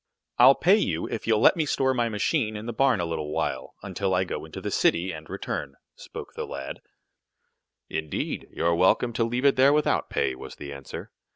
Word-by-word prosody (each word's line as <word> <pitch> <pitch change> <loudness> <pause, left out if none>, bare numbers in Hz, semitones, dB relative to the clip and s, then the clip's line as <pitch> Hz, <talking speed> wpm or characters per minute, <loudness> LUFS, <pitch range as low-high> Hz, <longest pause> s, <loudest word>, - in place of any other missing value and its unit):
"I'll 130 +3 +8
pay 190 +5 +4
you 85 - -1
if 110 - -5
you'll 110 -2 +3
let - - +6
me 160 -3 0
store 130 -1 +1
my 120 -2 0
machine 110 0 0
in 105 +1 -6
the 120 - -4
barn 130 -2 +3
a 85 - 0
little 80 -2 -4
while, 80 0 -3
until 95 -2 -1
I 90 - +2
go 95 - -5
into - - -8
the - - -4
city, 90 +3 +2
and 80 -1 -9
return," 70 -1 -4 0.2
spoke - - -9
the - - -5
lad. 70 0 -6 1.1
"Indeed, 80 -1 -3
you're 85 0 +1
welcome 95 +7 +3
to 115 - +1
leave 120 +3 -1
it 140 - +4
there 135 +2 +6
without 150 0 +1
pay," - - 0
was 65 - -9
the 70 0 -8
answer. 70 -1 -8
105 Hz, 205 wpm, -26 LUFS, 80-125 Hz, 1.1 s, I'll